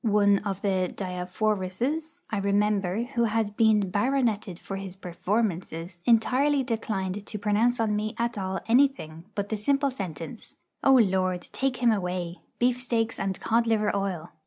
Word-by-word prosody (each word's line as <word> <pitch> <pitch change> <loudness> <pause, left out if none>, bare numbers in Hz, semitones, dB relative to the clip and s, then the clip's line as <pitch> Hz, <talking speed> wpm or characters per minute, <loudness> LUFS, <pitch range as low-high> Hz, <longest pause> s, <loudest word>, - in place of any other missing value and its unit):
One 205 -2 +4
of 200 -2 -4
the 185 -3 +1
Diafoiruses, 210 - -2
I 210 - 0
remember, 200 0 +1
who 240 -2 0
had 215 -2 0
been 215 -4 +3
baroneted 220 -4 0
for 195 +2 -6
his 195 -1 -7
performances, 180 -2 -2
entirely 265 +5 +3
declined 210 -5 -2
to 210 - -6
pronounce 215 +4 +2
on 215 -2 +1
me 215 +2 -2
at 235 +1 -1
all 190 -2 -3
anything 230 - +2
but 200 -1 -2
the 220 - -1
simple 275 +6 +1
sentence: 190 - -7 0.3
'O 270 - +6
Lord, 185 -6 +2
take 265 -2 -1
him 235 - +6
away 180 -3 -2 0.2
beef 245 0 +2
steaks 230 -3 -1
and 195 -1 -2
cod 230 +1 +1
liver 215 -2 +2
oil!' 185 -4 -3
210 Hz, 155 wpm, -27 LUFS, 190-235 Hz, 0.3 s, O